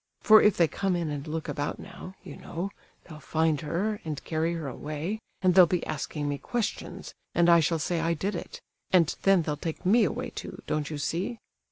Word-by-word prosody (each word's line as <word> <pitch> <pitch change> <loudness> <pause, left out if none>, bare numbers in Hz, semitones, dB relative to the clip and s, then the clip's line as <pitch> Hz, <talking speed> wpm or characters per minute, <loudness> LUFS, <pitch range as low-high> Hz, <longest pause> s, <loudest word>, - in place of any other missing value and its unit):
For 215 -1 +8
if 210 - +4
they 170 - +5
come 190 +5 -1
in 170 -3 -2
and 145 +1 -5
look 160 +1 -4
about 145 -2 -2
now, 185 - -10
you - - -9
know, 180 +4 -5 0.3
they'll 155 -3 -11
find 160 +1 +1
her, 195 +7 -2
and 150 -3 -5
carry 165 +1 -1
her 160 -4 -4
away, 155 - -4 0.2
and 185 -1 +5
they'll 180 -1 +8
be 180 0 -1
asking 150 0 -3
me 145 -1 -2
questions, 240 -3 -4 0.2
and 170 0 +4
I 170 -1 +7
shall 165 +1 +2
say 165 +2 -1
I 165 +1 +1
did 195 +6 -2
it, 175 - -6 0.3
and 170 -4 +4
then 195 -3 +4
they'll 150 -1 -2
take 165 +3 -5
me 220 +5 +5
away, 250 +3 -3
too, - - -8
don't 150 -1 -1
you 155 - -4
see? 175 - -2
165 Hz, 210 wpm, -28 LUFS, 155-185 Hz, 0.3 s, For